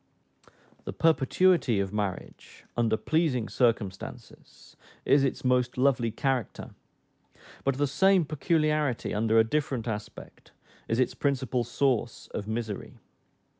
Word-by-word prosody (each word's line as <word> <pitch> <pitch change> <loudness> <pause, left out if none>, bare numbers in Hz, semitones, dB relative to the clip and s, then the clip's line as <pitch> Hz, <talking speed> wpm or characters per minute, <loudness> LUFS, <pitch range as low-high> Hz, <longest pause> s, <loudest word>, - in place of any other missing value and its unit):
The - - -5
perpetuity 165 - +3
of 100 0 -2
marriage, 100 -3 -5
under 115 -2 +1
pleasing 135 -2 0
circumstances, 110 -6 -3 0.3
is 140 0 +4
its 135 -1 -2
most 125 -1 +1
lovely 125 -3 +2
character; 130 +1 -2 0.9
but 135 -1 0
the 145 - +2
same 190 +5 +3
peculiarity, 155 -3 0
under 110 +1 +2
a 110 - +7
different 130 -1 -2
aspect, 105 -2 -7 0.3
is 115 - 0
its 130 - +1
principal 130 -3 -1
source 120 0 -1
of 105 - -4
misery. 110 -2 -5
125 Hz, 115 wpm, -28 LUFS, 110-140 Hz, 0.9 s, a